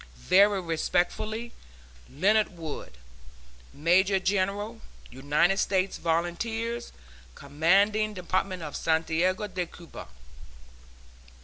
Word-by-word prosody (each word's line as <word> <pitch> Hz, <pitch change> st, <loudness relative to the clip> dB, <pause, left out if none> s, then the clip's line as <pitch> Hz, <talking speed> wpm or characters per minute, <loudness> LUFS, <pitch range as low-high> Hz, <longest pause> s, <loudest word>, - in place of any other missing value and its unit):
Very 200 Hz, -, +4 dB
respectfully, 185 Hz, +7 st, -1 dB, 0.6 s
LEONARD 195 Hz, +6 st, +1 dB
WOOD, 155 Hz, -, -7 dB, 0.7 s
Major 185 Hz, +6 st, +3 dB
General, 200 Hz, +4 st, -1 dB, 0.3 s
United 145 Hz, +9 st, +1 dB
States 190 Hz, -1 st, 0 dB
Volunteers. 220 Hz, +8 st, -2 dB, 0.4 s
Commanding 200 Hz, +9 st, +2 dB
Department 185 Hz, 0 st, -2 dB
of 150 Hz, -2 st, -6 dB
Santiago 165 Hz, +4 st, 0 dB
de 185 Hz, -3 st, -4 dB
Cuba. 170 Hz, -1 st, -11 dB
185 Hz, 80 wpm, -27 LUFS, 165-205 Hz, 0.7 s, Very